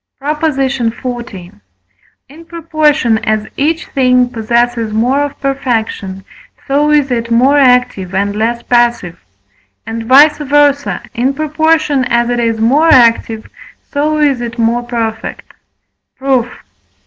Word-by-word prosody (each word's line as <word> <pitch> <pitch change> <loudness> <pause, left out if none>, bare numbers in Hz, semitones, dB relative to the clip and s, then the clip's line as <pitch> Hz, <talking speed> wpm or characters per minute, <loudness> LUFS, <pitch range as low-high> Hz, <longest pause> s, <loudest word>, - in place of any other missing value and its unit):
PROP. 295 +2 -4
XL. 245 -3 -3 0.9
In 320 +4 -15
proportion 310 -8 0
as 215 -1 -1
each 320 +4 -1
thing 250 -2 +1
possesses 235 0 -1
more 240 +6 +1
of 290 -1 -3
perfection, 225 -8 -3 0.4
so 290 +2 +1
is 295 -3 +2
it 235 -1 -2
more 260 +5 +3
active, 250 -8 +1
and 200 +1 -1
less 235 +2 -2
passive; 240 - 0 0.6
and, 225 +1 -5
vice 290 +5 +5
versâ, 290 0 +1
in 260 +4 -1
proportion 310 -1 +1
as 235 -1 0
it 240 - -1
is 230 -1 -1
more 280 +9 +3
active, 230 -2 +3 0.4
so 305 +1 0
is 285 -5 +1
it 235 -1 -6
more 230 +1 +1
perfect. 230 -2 -5 0.6
Proof. 260 -3 0
250 Hz, 125 wpm, -13 LUFS, 230-285 Hz, 0.9 s, vice